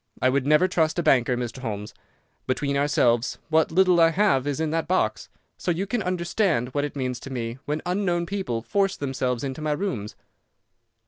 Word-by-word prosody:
I 130 - +3
would 135 +1 0
never 155 +5 +5
trust 160 -3 +1
a 175 - +1
banker, 125 -3 +3
Mr. 120 +1 -4
Holmes. 105 -4 -5 0.5
Between 140 +2 -1
ourselves, 135 -4 +2
what 160 0 +3
little 180 0 +4
I 165 0 +6
have 165 -7 +2
is 145 -1 -2
in 160 -1 -1
that 165 0 -1
box, 185 - 0 0.3
so - - -3
you 175 +3 0
can 215 +3 -1
understand 175 - 0
what 145 +2 -1
it 145 - -7
means 125 -3 -2
to 135 - -9
me 120 -1 -4
when 150 +1 -2
unknown 180 -2 0
people 170 - -3
force 195 - 0
themselves 130 -3 -2
into 135 +2 -4
my 155 -1 0
rooms." 135 - -3
145 Hz, 190 wpm, -25 LUFS, 125-175 Hz, 0.5 s, I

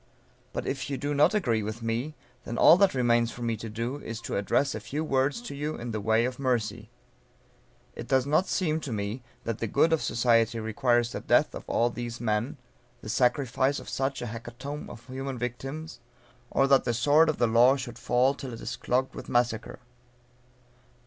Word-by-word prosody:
But - - -4
if 135 -1 -3
you 140 - -2
do 145 +3 -2
not 150 +8 +4
agree 120 - +1
with 110 +2 -5
me, 120 +7 -2 0.3
then 115 - -5
all 165 - +8
that 195 -5 +3
remains 120 -2 +3
for 120 - -8
me 115 -1 0
to 115 +2 -7
do, 115 +5 -3
is 115 -6 -6
to - - -4
address 105 +7 +1
a - - -4
few 150 +3 -4
words 135 - +1
to 240 - -6
you 150 +2 -3
in 120 0 -6
the 110 -1 -3
way 110 +3 +2
of 125 0 -4
mercy. 120 -6 -1 1.1
It - - -7
does 130 -1 +2
not 155 +6 +2
seem 160 -4 0
to 145 -5 -6
me 105 +3 -3 0.2
that 115 -2 -3
the 115 - -1
good 165 +9 +3
of 160 - +2
society 115 0 +2
requires 120 +2 +1
the - - -4
death - - +2
of - - -8
all 120 +1 +2
these 120 0 -5
men, 115 +5 -1 0.4
the - - -8
sacrifice 130 +3 +1
of - - -12
such 135 -1 -2
a 115 -2 -5
hecatomb 120 +6 -7
of 115 - -11
human 130 0 -5
victims, 135 +6 -5 0.5
or 135 - +3
that 135 -1 +4
the 120 -2 -1
sword 150 +7 +4
of 155 - 0
the 120 - +3
law 120 +4 +5
should 125 -4 -6
fall 125 +3 +2
till 135 -3 -7
it 115 - -8
is - - -5
clogged 130 +2 0
with - - -9
massacre. 120 -2 0
125 Hz, 200 wpm, -28 LUFS, 115-140 Hz, 1.1 s, all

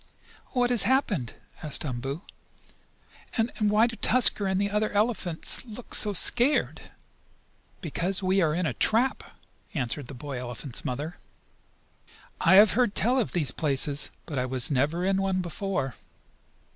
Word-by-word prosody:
"What 245 -1 +1
has 240 - +5
happened?" 205 - 0 0.3
asked 155 -1 +1
Umboo. 135 +5 -5 1.1
"And 225 +1 0
why 210 +1 +3
do 235 -1 -4
Tusker 225 -4 +4
and 190 0 0
the 200 0 -1
other 210 +1 0
big - - -10
elephants 205 -6 -1
look 235 0 -10
so 210 - +3
scared?" 245 - +2 1.0
"Because 180 +4 -2
we 190 +1 +2
are 155 -3 +1
caught 170 - -2
in - - -1
a - - -1
trap," 235 +4 0 0.5
answered 135 0 -3
the 140 - -9
boy 135 0 -6
elephant's 125 +1 -5
mother. 145 +7 -5 1.2
"I 190 - +4
have 205 +2 +7
heard 240 -3 +1
tell 250 +5 +1
of 230 - -2
these 150 -7 0
places, 145 0 +1 0.2
but 145 -5 -4
I 125 - -1
was 130 +2 +3
never 150 +7 0
in 195 0 +1
one 190 -1 -1
before." 175 - -3
185 Hz, 155 wpm, -26 LUFS, 145-215 Hz, 1.2 s, have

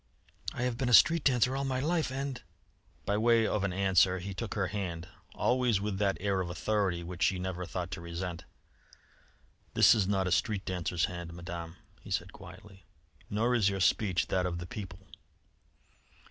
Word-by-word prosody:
I 120 - -4
have 125 -1 -1
been 130 -2 0
a 120 - +8
street 165 +4 +6
dancer 125 -1 +3
all 135 - -1
my 130 -1 -1
life, 160 0 0
and 135 -1 -4 0.3
" - - -35
By 100 - +1
way 115 0 +4
of 105 -2 0
an 100 - 0
answer 95 -1 +3
he 95 +2 -5
took 110 +3 -5
her 95 -3 0
hand, 90 -4 -4 0.3
always 125 -5 +2
with 100 -1 -3
that 100 -1 +1
air 100 -1 0
of 90 - -4
authority 90 +1 -1
which 90 0 -8
she 95 - +3
never 90 -1 -4
thought 90 0 -4
to 95 - -5
resent. 85 0 -5 1.3
"This - - +7
is 100 -4 +1
not 95 -1 +1
a 90 - -1
street 100 +1 0
dancer's 90 -2 -1
hand; 85 -3 -7
Madame," 85 -1 -7 0.3
he - - -12
said - - -2
quietly. 95 -2 -13 0.5
"Nor 115 +4 +1
is 110 -5 +3
your 100 -1 -3
speech 95 0 +2
that 90 -1 +1
of 85 -1 -3
the 85 - -6
people." 95 0 -8
95 Hz, 190 wpm, -30 LUFS, 90-115 Hz, 1.3 s, a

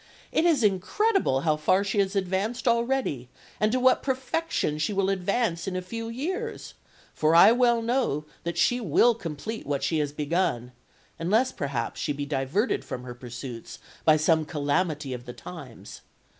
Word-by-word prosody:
It 320 - +2
is 310 -8 +3
incredible 210 - +2
how 155 -1 +2
far 185 +6 +2
she 200 +1 -1
has 195 0 +1
advanced 195 +6 -1
already, 235 - 0 0.3
and 215 0 +2
to 255 - +1
what 255 0 +4
perfection 265 - -1
she 155 +7 0
will 195 0 +1
advance 195 -2 -1
in 190 - -3
a 185 - -1
few 230 +5 -5
years; 375 - -4 0.4
for 155 +1 +2
I 170 +6 +9
well 240 -1 +3
know 230 - 0 0.2
that 170 0 -3
she 245 0 +2
will 230 +5 +4
complete 210 +2 -6
what 140 -1 -1
she 155 +3 +1
has 145 -1 -1
begun, 145 -5 -1 0.5
unless 220 +10 +2
perhaps 135 - -3
she 145 - -1
be 145 0 -4
diverted 140 - 0
from 125 - -6
her 125 -1 -7
pursuits 120 0 -8 0.3
by 155 -1 +5
some 160 +1 +3
calamity 150 -1 -1
of 125 -1 -7
the 125 - -6
times.... 140 -9 -10
185 Hz, 170 wpm, -26 LUFS, 145-235 Hz, 0.5 s, I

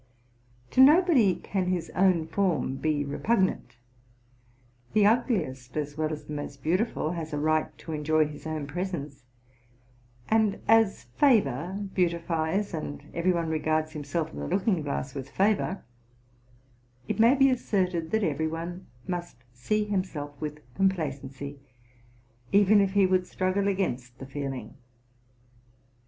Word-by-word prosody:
To 260 - +5
nobody 290 - +6
ean 190 -2 +1
his 180 -3 -2
own 180 -3 +3
form 160 -8 0
be 150 -1 0
repugnant; 185 - 0 1.2
the 210 -1 +4
ugliest, 175 - 0
as 145 -1 -3
well 155 0 -1
as 150 - -6
the 150 - -7
most 145 -2 -6
beautiful, 180 -1 0
has 165 -3 -5
a - - -1
right 155 +1 0
to 160 - -9
enjoy 155 +1 +2
his 150 +1 -8
own 155 -2 -3
presence: 150 -3 -5 1.1
and 220 -2 +2
as 225 - +4
favor 190 - +1
beautifies, 170 +2 0
and 145 -2 -6
every 170 +2 +2
one 170 -2 -1
regards 155 0 0
himself 155 +2 -3
in - - -7
the - - -4
looking 185 -1 +1
glass 140 -2 -3
with 135 -1 -6
favor, 195 0 +1 1.2
it - - -2
may 235 +4 +6
be 270 -1 +5
asserted 185 -9 0
that 220 -1 +1
every 160 -2 0
one 170 +3 -6 0.2
must 175 -4 -4 0.2
see 210 - 0
himself 185 -8 -3
with 150 0 -5
complacency, 140 -6 -2 0.9
even 205 +1 +6
if 195 0 0
be 200 -1 +5
would 185 -1 +1
struggle 185 +2 0
against 130 -11 -2
the 135 - -8
feeling. 135 -1 -5
170 Hz, 135 wpm, -27 LUFS, 150-195 Hz, 1.2 s, nobody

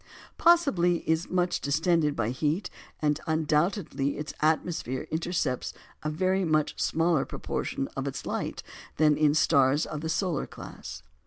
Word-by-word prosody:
Possibly 205 - +4
it - - -1
is 160 +1 0
much 180 -1 0
distended 155 0 +2
by 115 0 0
heat, 150 +8 -1 0.3
and 150 0 +2
undoubtedly 155 -2 0
its 150 +1 -5
atmosphere 155 -4 0
intercepts 160 -5 -1 0.3
a 150 - -2
very 185 +4 +1
much 155 -3 0
smaller 165 -2 +2
proportion 135 - -3
of 135 +1 -3
its 135 -2 -5
light - - -3 0.3
than 150 -1 +4
in 150 -1 +3
stars 140 -1 +4
of 150 - -5
the 160 - -3
solar 165 -2 -1
class. - - -9
155 Hz, 145 wpm, -28 LUFS, 145-175 Hz, 0.3 s, Possibly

